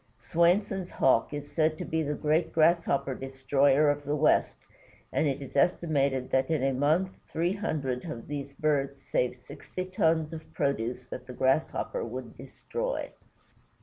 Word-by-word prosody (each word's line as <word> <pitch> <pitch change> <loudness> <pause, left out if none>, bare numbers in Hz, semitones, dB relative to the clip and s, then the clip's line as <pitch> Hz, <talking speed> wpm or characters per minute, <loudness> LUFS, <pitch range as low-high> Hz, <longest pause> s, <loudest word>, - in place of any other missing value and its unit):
Swainson's 185 +2 +1
Hawk 115 -3 +2
is 145 -1 -6
said 155 -1 +1
to - - -5
be 160 0 -1
the 150 -1 -1
great 155 +3 +1
Grasshopper 160 -4 +2
destroyer 135 +2 +2
of 145 0 -4
the 145 +1 -1
west, 150 +1 +2 0.5
and 155 - +2
it 140 0 -2
is 135 - -11
estimated 140 -4 +1
that 130 0 +2
in 155 -5 +1
a 135 0 +2
month 155 +8 +2 0.2
three 170 +3 0
hundred 145 - -2
of 135 -9 -7
these 140 -1 -5
birds 140 -1 0
save 125 -2 -1
sixty 145 +8 -7
tons 160 -3 +1
of 160 -1 -9
produce 125 -3 -1
that 125 - -8
the 125 - -7
Grasshopper 155 - 0
would - - -6
destroy. - - -4
145 Hz, 155 wpm, -29 LUFS, 135-165 Hz, 0.5 s, Hawk